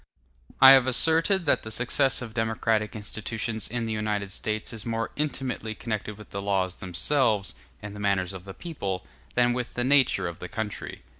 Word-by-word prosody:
I 135 - +11
have 135 -2 +7
asserted 165 +8 +3
that 145 - +3
the 110 - -8
success 125 +3 +2
of 115 -2 -8
democratic 110 -1 0
institutions 110 +1 -3
in 120 0 -3
the 110 - -2
United 105 -2 -2
States 110 +3 -3
is 110 -2 -6
more 115 0 -2
intimately 130 -7 -3
connected 105 -2 -4
with 105 - -13
the 100 - -4
laws 95 -2 0
themselves, 105 - +1 0.3
and 105 -1 -7
the - - -8
manners 100 -2 0
of 95 -1 -8
the 95 0 -9
people, 100 - -4 0.3
than 120 0 +3
with 125 0 -4
the 120 - 0
nature 130 -8 +3
of 85 -1 -7
the 90 - -7
country. 110 -2 -5
110 Hz, 180 wpm, -26 LUFS, 100-125 Hz, 0.3 s, I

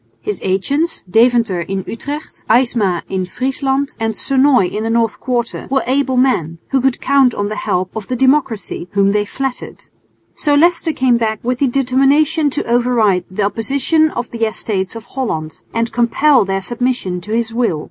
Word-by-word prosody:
His 420 -1 -4
agents, 280 - -1
Deventer 225 -2 +3
in 190 +2 -3
Utrecht, 285 +7 -7
Aysma 220 -7 +2
in 185 -1 -3
Friesland 270 +5 -1
and 225 -1 -1
Sonoy 270 -5 +3
in 210 +4 -3
the 225 - -2
North 230 -1 0
Quarter, 240 -2 -3
were 270 0 +1
able 260 0 0
men, 175 - +1
who 270 - +2
could 265 -1 +1
count 270 -3 +3
on 205 0 -2
the 215 - -4
help 185 -1 -2
of 220 -3 -5
the 255 - -2
democracy, 255 -8 0
whom 200 0 +3
they 210 0 +1
flattered. 270 +4 -5 0.5
So 290 -1 +1
Leicester 335 +2 +3
came 260 -5 +2
back 220 -2 -1
with 250 +1 -1
the 280 - +3
determination 275 +4 +2
to 290 - -2
override 235 -6 +2
the 185 +2 -2
opposition 280 +9 +1
of 240 -4 -5
the 230 -1 -3
Estates 205 -3 -3
of 225 0 -8
Holland 160 -13 -4
and 230 0 -1
compel 245 +2 +3
their 195 0 -1
submission 240 -5 -2
to 210 +5 -9
his 230 0 -1
will. 230 -10 0
240 Hz, 175 wpm, -17 LUFS, 205-270 Hz, 0.5 s, Deventer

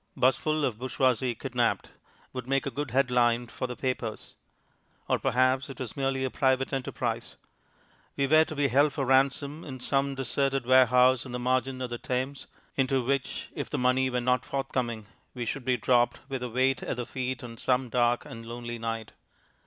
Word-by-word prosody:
"'Busful 150 +4 +2
of 115 -5 -2
Bourgeoisie 130 -1 +1
Kidnapped" 125 -1 -1 0.4
would 125 -1 -5
make 135 +1 +1
a 140 - -2
good 145 +2 -3
head 130 +2 +2
line 120 -1 +3
for 125 +2 -5
the 125 - -5
papers. 120 -2 -3 0.7
Or - - +1
perhaps 130 +2 +2
it 135 - -9
was 130 -3 -5
merely 135 -1 0
a 130 - -1
private 130 0 +1
enterprise. 135 -1 -3 0.8
We 140 - +2
were 155 +3 +6
to 155 - -7
be 145 -1 +2
held 140 +3 +4
for 140 - -1
ransom 140 +4 +2
in 130 -3 -7
some 135 +2 0
deserted 135 0 0
warehouse 130 0 +5
on 125 - -9
the 125 - -2
margin 130 +1 0
of 125 - -4
the 120 - -4
Thames, 130 -1 -3 0.3
into 130 -2 +1
which, 135 0 -2
if - - -4
the - - -2
money 130 +1 +2
were 125 -1 0
not 125 -1 +2
forthcoming, 120 -5 -2 0.3
we 120 -1 -3
should 125 +2 -4
be 130 -1 +2
dropped 120 +1 +2
with 135 -2 -4
a 125 - -3
weight 130 +3 +1
at - - -3
the 120 - -3
feet 130 -1 -4
on 115 -1 -8
some 125 +1 +1
dark 120 0 +1
and 115 0 -9
lonely 120 0 -6
night.... 115 -1 -4
130 Hz, 190 wpm, -28 LUFS, 120-135 Hz, 0.8 s, were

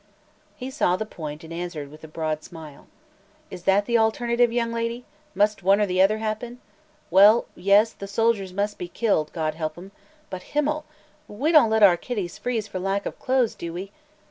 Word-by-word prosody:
He 255 +1 -7
saw 220 -10 +1
the 220 - -3
point 155 -5 -8
and 165 +1 -9
answered 165 -5 -5
with 155 +1 -15
a - - -8
broad 155 -1 -3
smile: 155 -4 -12 0.6
"Is 175 - -9
that 200 +1 +3
the 235 0 +2
alternative, 235 +2 +2
young 230 -1 -1
lady? 230 +1 -3 0.3
Must 210 0 +2
one 195 +2 +4
or 210 - +3
the 185 -1 +1
other 205 +3 +4
happen? 220 +3 -4 0.5
Well 205 +5 +6
yes; 200 +4 +3
the 200 - -8
soldiers 205 -2 0
must 205 +2 -2
be 180 - -4
killed, 175 -6 0
God 155 -2 -2
help 155 0 -4
'em! 190 +3 -11 0.4
But 185 -1 -5 0.2
himmel! 300 +1 0 0.4
We 270 +10 -1
don't 300 -9 +6
let 220 -1 +3
our 180 -4 +7
kiddies 195 -3 -5
freeze 230 -4 -2
for 185 - -5
lack 195 +2 -1
of - - -6
clothes, 255 -3 +1
do 170 -1 -7
we? 190 +3 -6
200 Hz, 195 wpm, -24 LUFS, 175-230 Hz, 0.6 s, our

